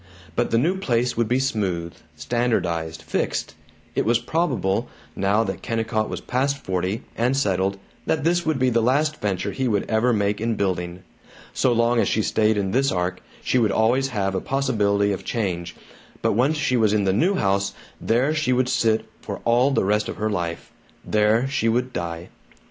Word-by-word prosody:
But -, -, +1 dB
the 115 Hz, -, +2 dB
new 175 Hz, +10 st, +1 dB
place 125 Hz, -8 st, 0 dB
would 115 Hz, -1 st, +1 dB
be 125 Hz, +3 st, +2 dB
smooth, 95 Hz, -10 st, -1 dB, 0.2 s
standardized, 85 Hz, -10 st, -1 dB
fixed. -, -, -2 dB, 0.4 s
It -, -, +1 dB
was 115 Hz, +1 st, +3 dB
probable, 120 Hz, -, -1 dB, 0.3 s
now 100 Hz, +3 st, +2 dB
that 95 Hz, -3 st, -4 dB
Kennicott 110 Hz, -1 st, -1 dB
was -, -, -5 dB
past 140 Hz, +3 st, 0 dB
forty, 95 Hz, 0 st, -2 dB
and 125 Hz, +4 st, +1 dB
settled, 95 Hz, -6 st, +1 dB, 0.3 s
that 155 Hz, -3 st, +1 dB
this 175 Hz, +2 st, +2 dB
would 155 Hz, -3 st, 0 dB
be 130 Hz, -1 st, +2 dB
the 115 Hz, 0 st, +2 dB
last 150 Hz, +6 st, +1 dB
venture 95 Hz, -3 st, -1 dB
he 130 Hz, -1 st, -1 dB
would 105 Hz, -4 st, 0 dB
ever 110 Hz, +3 st, +2 dB
make 105 Hz, -2 st, 0 dB
in 115 Hz, 0 st, 0 dB
building. 90 Hz, -3 st, -2 dB, 0.5 s
So 130 Hz, -, +2 dB
long 120 Hz, 0 st, +2 dB
as -, -, +2 dB
she 110 Hz, -, +1 dB
stayed 110 Hz, 0 st, +2 dB
in 95 Hz, -2 st, -1 dB
this 135 Hz, +4 st, +2 dB
ark, 90 Hz, 0 st, -2 dB, 0.2 s
she 130 Hz, -, +2 dB
would 110 Hz, -4 st, +2 dB
always 120 Hz, +5 st, +2 dB
have 100 Hz, -6 st, -1 dB
a 95 Hz, -, -1 dB
possibility 105 Hz, -7 st, +1 dB
of 95 Hz, -1 st, -4 dB
change, 90 Hz, -6 st, -3 dB, 0.5 s
but -, -, +3 dB
once 135 Hz, +8 st, +2 dB
she 130 Hz, -4 st, +1 dB
was 110 Hz, -3 st, +3 dB
in 105 Hz, -1 st, +2 dB
the 95 Hz, -1 st, +2 dB
new 175 Hz, -, +2 dB
house, 100 Hz, -, 0 dB, 0.3 s
there 125 Hz, +7 st, +2 dB
she 155 Hz, -5 st, +1 dB
would 125 Hz, 0 st, +1 dB
sit 110 Hz, -2 st, +2 dB, 0.2 s
for -, -, -6 dB
all 120 Hz, +3 st, +4 dB
the 135 Hz, -, +1 dB
rest 105 Hz, +2 st, +1 dB
of -, -, -4 dB
her 110 Hz, +1 st, -1 dB
life 85 Hz, -4 st, -3 dB, 0.3 s
there 110 Hz, +4 st, +2 dB
she 125 Hz, -5 st, 0 dB
would 125 Hz, +2 st, 0 dB
die. 85 Hz, 0 st, -4 dB
110 Hz, 190 wpm, -23 LUFS, 100-125 Hz, 0.5 s, all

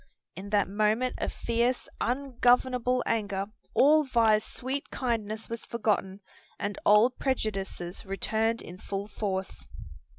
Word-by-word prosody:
In 195 Hz, +2 st, -7 dB
that 205 Hz, -1 st, +2 dB
moment 215 Hz, +5 st, +1 dB
of -, -, -1 dB
fierce, 235 Hz, +2 st, 0 dB
ungovernable 250 Hz, -1 st, +2 dB
anger 205 Hz, -3 st, -1 dB, 0.3 s
all 305 Hz, +3 st, +6 dB
Vi's 225 Hz, -5 st, +3 dB
sweet 265 Hz, +4 st, -5 dB
kindness 225 Hz, -3 st, -2 dB
was 230 Hz, 0 st, -6 dB
forgotten 205 Hz, -4 st, -1 dB, 0.4 s
and 205 Hz, -1 st, -3 dB
old 215 Hz, +5 st, +5 dB
prejudices 195 Hz, -8 st, -2 dB
returned 220 Hz, +4 st, 0 dB
in 180 Hz, +2 st, -10 dB
full 200 Hz, +1 st, -4 dB
force. 190 Hz, -, -4 dB
220 Hz, 120 wpm, -28 LUFS, 200-245 Hz, 0.4 s, all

